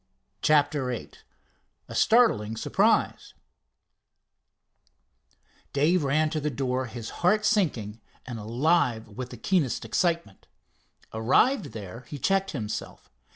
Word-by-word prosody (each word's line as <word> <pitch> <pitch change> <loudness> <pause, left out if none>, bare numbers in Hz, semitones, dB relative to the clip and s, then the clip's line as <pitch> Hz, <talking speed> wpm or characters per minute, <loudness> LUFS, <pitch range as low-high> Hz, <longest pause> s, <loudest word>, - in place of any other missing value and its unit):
CHAPTER 145 -3 +2
VIII 125 -3 -5 0.8
A - - -9
STARTLING 165 - +3
SURPRISE - - +1 2.4
Dave 155 +4 +2
ran 155 +3 +1
to 155 - -1
the 150 - -1
door, 130 -1 -2
his 115 -1 -7
heart 210 +5 +3
sinking, 120 - 0 0.2
and 120 -3 -6
alive 120 0 +1
with 125 +4 -7
the 125 - -9
keenest 150 - 0
excitement. 165 - -1 0.7
Arrived 135 - +3
there, 105 0 -8
he 145 - -7
checked 195 +7 +1
himself. 110 -8 -6
135 Hz, 110 wpm, -26 LUFS, 115-170 Hz, 2.4 s, STARTLING